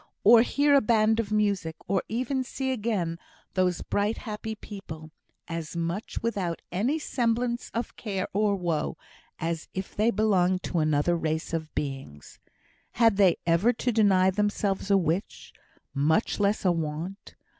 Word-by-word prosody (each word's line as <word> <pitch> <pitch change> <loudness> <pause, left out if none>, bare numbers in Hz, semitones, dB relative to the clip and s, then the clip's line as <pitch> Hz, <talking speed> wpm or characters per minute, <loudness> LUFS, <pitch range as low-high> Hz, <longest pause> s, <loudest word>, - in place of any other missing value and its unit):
or 225 +2 +8
hear 285 +4 +2
a 280 - +6
band 220 0 +3
of 215 -2 -2
music! 200 -6 0
or 190 0 +1
even 255 +3 -1
see 265 +1 -3
again 205 -9 -1 0.3
those 180 -2 +1
bright, 205 +2 0
happy 220 -1 -5
people 160 -7 -9 0.4
as 165 -1 -5
much 170 +7 -3
without 195 -7 -1
any 230 - 0
semblance 240 -4 -1
of 235 - -3
care 195 -4 -3
or 205 0 +2
woe 170 -5 -2 0.4
as 165 -1 -3
if 190 0 -5
they 215 +3 +3
belonged 190 -4 +2
to 175 - -1
another 155 +2 +2
race 160 -1 -2
of 160 -1 -3
beings. 135 - -6 0.5
Had 225 -4 +4
they 190 -4 +5
ever 170 +8 +4
to 245 +1 -1
deny 195 -4 +4
themselves 205 -1 -1
a 200 - +5
wish, 175 +2 -2 0.4
much 155 +12 +1
less 205 +1 +1
a 180 - +5
want? 165 +4 -4
195 Hz, 150 wpm, -27 LUFS, 170-220 Hz, 0.5 s, or